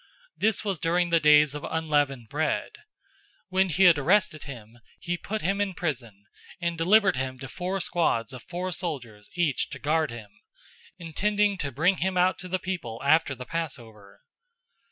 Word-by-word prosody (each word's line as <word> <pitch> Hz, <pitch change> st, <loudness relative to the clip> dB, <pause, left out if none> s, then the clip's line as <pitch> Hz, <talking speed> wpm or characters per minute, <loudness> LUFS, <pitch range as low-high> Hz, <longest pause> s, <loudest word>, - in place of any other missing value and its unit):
This 220 Hz, 0 st, 0 dB
was 195 Hz, -5 st, -1 dB
during 175 Hz, +1 st, +1 dB
the 170 Hz, -, +5 dB
days 150 Hz, -1 st, +5 dB
of 150 Hz, -, -6 dB
unleavened 145 Hz, -6 st, 0 dB
bread. -, -, -1 dB
012:004 -, -, -17 dB, 0.7 s
When 190 Hz, 0 st, +2 dB
he 175 Hz, +4 st, +2 dB
had 170 Hz, -5 st, +7 dB
arrested 165 Hz, 0 st, +2 dB
him, 120 Hz, -4 st, -10 dB, 0.2 s
he 175 Hz, -1 st, -2 dB
put 215 Hz, +4 st, -5 dB
him 195 Hz, +4 st, 0 dB
in 195 Hz, -3 st, -1 dB
prison, 120 Hz, -, -4 dB, 0.3 s
and 170 Hz, 0 st, -1 dB
delivered 190 Hz, +1 st, +4 dB
him 130 Hz, 0 st, -3 dB
to 135 Hz, +1 st, -8 dB
four 185 Hz, +5 st, -3 dB
squads 130 Hz, -, 0 dB
of 125 Hz, -, -8 dB
four 180 Hz, +1 st, -4 dB
soldiers 125 Hz, -, -5 dB
each 170 Hz, -6 st, 0 dB
to -, -, -7 dB
guard 155 Hz, +2 st, +1 dB
him, 110 Hz, -4 st, -9 dB, 0.7 s
intending 205 Hz, +4 st, 0 dB
to 140 Hz, -4 st, -2 dB
bring 170 Hz, +9 st, +2 dB
him 185 Hz, +1 st, -1 dB
out 180 Hz, +1 st, +3 dB
to 185 Hz, -, -6 dB
the 185 Hz, +1 st, -1 dB
people 180 Hz, -12 st, -5 dB
after 145 Hz, -1 st, +3 dB
the 125 Hz, 0 st, -8 dB
Passover. 120 Hz, -11 st, -6 dB
160 Hz, 175 wpm, -26 LUFS, 130-185 Hz, 0.7 s, had